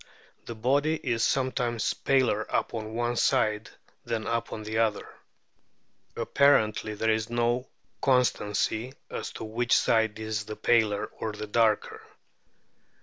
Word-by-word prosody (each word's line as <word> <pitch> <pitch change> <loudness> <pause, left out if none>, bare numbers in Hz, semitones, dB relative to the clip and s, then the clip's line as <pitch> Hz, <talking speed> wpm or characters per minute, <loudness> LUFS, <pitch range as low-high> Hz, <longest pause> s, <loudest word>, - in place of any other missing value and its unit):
The 115 - -6
body 140 +7 +1
is 120 -7 -1
sometimes 125 -3 0
paler 130 -6 +2
upon 110 -1 -2
one 120 0 -1
side 105 -1 +1 0.3
than 115 -2 -3
upon 115 -2 -3
the 110 +1 -2
other; 110 -2 0 1.1
apparently 110 -6 +2
there 110 +1 +1
is 110 +1 -1
no 120 +2 0 0.3
constancy 125 -2 +1 0.2
as - - -5
to - - -7
which 115 +2 +1
side 110 -1 +2
is 110 -1 -3
the 110 0 -6
paler 110 -4 +2
or 110 -1 -3
the 105 0 -6
darker. 110 0 +1
115 Hz, 125 wpm, -27 LUFS, 110-120 Hz, 1.1 s, paler